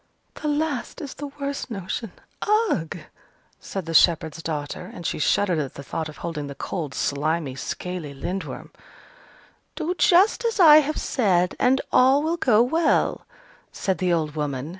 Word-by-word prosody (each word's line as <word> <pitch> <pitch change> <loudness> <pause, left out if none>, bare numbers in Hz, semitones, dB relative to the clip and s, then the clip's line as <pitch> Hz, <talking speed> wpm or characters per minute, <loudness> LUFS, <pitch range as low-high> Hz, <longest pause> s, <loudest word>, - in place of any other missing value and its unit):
"The 300 - -2
last 295 -1 -2
is 290 -5 -6
the 290 - -6
worst 280 0 -5
notion 200 0 -4 0.6
ugh!" 160 -1 -2 0.6
said 195 -3 -6
the 165 - -5
shepherd's 160 -1 +3
daughter, 150 -3 -5
and 175 - -10
she - - -2
shuddered 180 +2 +2
at 140 -3 -4
the 140 - -8
thought 155 +5 -4
of 150 - -12
holding 155 -4 -4
the 140 - -8
cold, 155 -6 -5
slimy, 150 0 -1
scaly 165 +3 -5
Lindworm. 185 +7 -5 1.0
"Do 335 +2 -2
just 380 +7 +4
as 460 -3 -1
I 310 -4 +9
have 305 0 +1
said, 185 -7 +1
and 265 +2 +3
all 265 +3 +5
will 330 +2 0
go 235 -7 +4
well," 320 +7 +1 0.4
said 190 -1 -2
the 180 -1 +1
old 155 -3 0
woman. 145 -2 -3
185 Hz, 160 wpm, -24 LUFS, -, 1.0 s, I